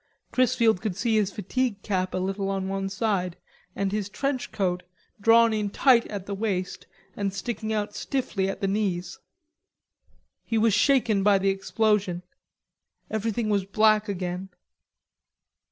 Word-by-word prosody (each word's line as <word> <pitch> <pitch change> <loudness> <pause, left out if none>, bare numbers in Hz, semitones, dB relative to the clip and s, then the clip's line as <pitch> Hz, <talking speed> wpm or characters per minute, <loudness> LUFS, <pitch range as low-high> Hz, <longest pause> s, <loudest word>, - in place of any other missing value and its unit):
Chrisfield 235 -5 +3
could 215 -5 -2
see 225 +1 +1
his 205 -2 +1
fatigue 210 +2 -2
cap 185 -3 -1
a - - 0
little 195 +1 -2
on 195 -1 -2
one 195 0 -2
side 195 -4 -1 0.4
and 200 -1 -1
his 205 -1 -2
trench 275 +4 -2
coat, 180 -3 -1 0.4
drawn 230 +1 +6
in 210 -1 -1
tight 240 +2 +4
at 200 -3 -6
the 200 - -4
waist 195 -3 -3 0.3
and 200 -1 -1
sticking 220 +2 -4
out 210 -1 -1
stiffly 210 -9 -2
at - - -5
the 195 - +1
knees. 190 -3 -2 1.2
He 225 - -1
was 220 -1 +3
shaken 230 -3 +3
by 200 0 +5
the 195 0 +1
explosion. 195 -2 0 0.9
Everything 220 +1 -1
was 205 -2 +1
black 215 +1 +3
again. 180 0 -3
205 Hz, 145 wpm, -26 LUFS, 195-220 Hz, 1.2 s, drawn